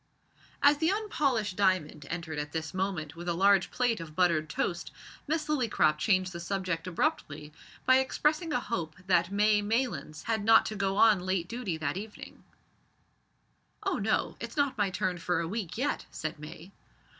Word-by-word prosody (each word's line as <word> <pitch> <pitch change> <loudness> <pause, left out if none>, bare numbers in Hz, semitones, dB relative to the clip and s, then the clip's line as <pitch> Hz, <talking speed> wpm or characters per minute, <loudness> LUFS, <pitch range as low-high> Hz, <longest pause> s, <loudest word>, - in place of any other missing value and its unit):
As 285 +1 +6
the 320 +1 +2
unpolished 280 - 0
diamond 185 -7 0
entered 165 -3 -4
at 150 0 -5
this 160 0 -3
moment 185 -5 -2
with 175 +1 -5
a 170 - 0
large 195 +1 +4
plate 245 -4 0
of 160 -2 -9
buttered 170 -4 +2
toast, 175 +4 -2 0.4
Miss 310 +1 0
Lillycrop 235 - +2
changed 185 -1 +1
the 170 - -6
subject 185 -2 -3
abruptly 155 - -2 0.3
by 260 0 +6
expressing 305 +5 0
a 300 - +1
hope 170 -10 -4
that 180 -1 +2
May 210 +1 +3
Maylands 215 - -2
had 225 -2 -1
not 225 +1 +6
to 215 - -4
go 195 -1 -1
on 215 -3 +6
late 185 -1 -1
duty 220 -7 -3
that 155 +1 -2
evening. 210 +2 -9 1.4
"Oh, - - 0
no; - - 0
it's - - -7
not 280 -2 +2
my 205 -4 +1
turn 185 -2 -2
for 180 0 0
a 170 - -2
week 200 -1 -4
yet," 285 +4 -1
said 155 0 -5
May. 155 +4 -10
190 Hz, 170 wpm, -29 LUFS, 170-230 Hz, 1.4 s, As